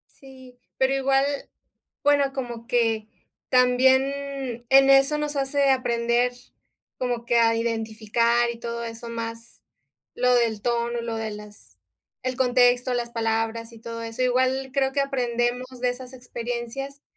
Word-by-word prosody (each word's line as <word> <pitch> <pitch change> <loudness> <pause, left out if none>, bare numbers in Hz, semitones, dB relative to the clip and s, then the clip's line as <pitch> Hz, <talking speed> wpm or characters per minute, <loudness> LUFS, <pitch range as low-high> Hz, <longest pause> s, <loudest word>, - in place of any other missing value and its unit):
Sí, 260 -2 -15 0.2
pero 265 +1 +2
igual, 270 0 +2 0.8
bueno, 285 -1 +3
como 240 -3 -6
que 225 -3 +1 0.4
también 260 0 +2
en 270 0 +6
eso 275 +2 +5
nos 300 0 -2
hace 275 0 +1
aprender 240 -1 +1 0.7
como 245 -2 -2
que 235 - +2
a 230 -1 +4
identificar 230 +1 0
y 235 0 -8
todo 235 0 -4
eso, 230 +1 -7
más 230 0 -7 0.5
lo 250 0 +2
del 225 -3 +1
tono, 235 0 -1
lo 230 -1 -4
de 220 -1 -3
las 210 0 -12 0.4
el 255 -1 -2
contexto, 250 -1 +3
las 240 -1 -2
palabras 225 0 -2
y 230 - -13
todo 230 0 -6
eso. 230 +2 -4
Igual 260 +1 +1
creo 270 -1 +1
que 280 - 0
aprendemos 245 -2 -1
de 250 - +1
esas 250 +1 -7
experiencias, 245 +2 -6
245 Hz, 140 wpm, -24 LUFS, 230-265 Hz, 0.8 s, en